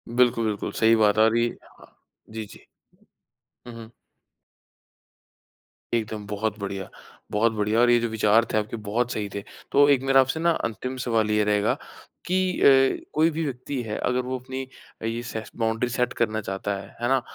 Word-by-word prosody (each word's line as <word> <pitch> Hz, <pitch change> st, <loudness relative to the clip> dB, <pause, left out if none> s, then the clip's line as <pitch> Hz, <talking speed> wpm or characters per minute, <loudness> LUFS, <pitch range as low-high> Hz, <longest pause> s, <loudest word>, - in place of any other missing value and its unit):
बिल्कुल, 120 Hz, -2 st, +3 dB
बिल्कुल। 105 Hz, -2 st, -2 dB
सही 115 Hz, 0 st, +4 dB
बात 105 Hz, -1 st, +3 dB
और 110 Hz, +1 st, +4 dB
ये 120 Hz, 0 st, +3 dB, 0.2 s
हाँ, -, -, -19 dB
हाँ। -, -, -18 dB, 0.3 s
जी, 110 Hz, 0 st, -6 dB
जी। -, -, -15 dB, 1.0 s
हुँ, 120 Hz, -, -8 dB
हुँ। 115 Hz, -1 st, -10 dB, 2.0 s
एकदम 110 Hz, -2 st, -2 dB
बहुत 105 Hz, 0 st, -2 dB
बढ़िया, 100 Hz, -2 st, -5 dB, 0.4 s
बहुत 110 Hz, +2 st, +2 dB
बढ़िया 105 Hz, +1 st, 0 dB
और 120 Hz, 0 st, +5 dB
ये 120 Hz, 0 st, +5 dB
जो 120 Hz, -, -1 dB
विचार 110 Hz, +1 st, +3 dB
थे -, -, +3 dB
आपके 110 Hz, +2 st, -2 dB
बहुत 120 Hz, +4 st, 0 dB
सही 105 Hz, -3 st, -3 dB
थे। 100 Hz, -, -4 dB, 0.3 s
तो 145 Hz, +1 st, +6 dB
एक 140 Hz, -3 st, +4 dB
मेरा 135 Hz, 0 st, +4 dB
आपसे 135 Hz, +4 st, -1 dB
ना 170 Hz, +1 st, +3 dB
अंतिम 130 Hz, +4 st, -4 dB
सवाल 110 Hz, -3 st, +1 dB
ये 105 Hz, 0 st, +3 dB
रहेगा 105 Hz, 0 st, +2 dB, 0.5 s
कि 185 Hz, 0 st, 0 dB
अ, -, -, +4 dB, 0.5 s
कोई 160 Hz, +2 st, +4 dB
भी 165 Hz, +2 st, -2 dB
व्यक्ति 130 Hz, 0 st, -4 dB
है 105 Hz, -2 st, -4 dB
अगर 125 Hz, +1 st, 0 dB
वो 130 Hz, +1 st, -4 dB
अपनी 130 Hz, +1 st, -6 dB, 0.4 s
ये 115 Hz, +1 st, -2 dB
से 110 Hz, -2 st, -5 dB
बाउंड्री 115 Hz, +1 st, 0 dB
सेट 125 Hz, +1 st, -1 dB
करना 110 Hz, -2 st, 0 dB
चाहता 100 Hz, 0 st, -3 dB
है, 100 Hz, 0 st, -9 dB
है 120 Hz, -, +1 dB
ना? 135 Hz, -1 st, +3 dB
115 Hz, 185 wpm, -25 LUFS, 105-125 Hz, 2.0 s, तो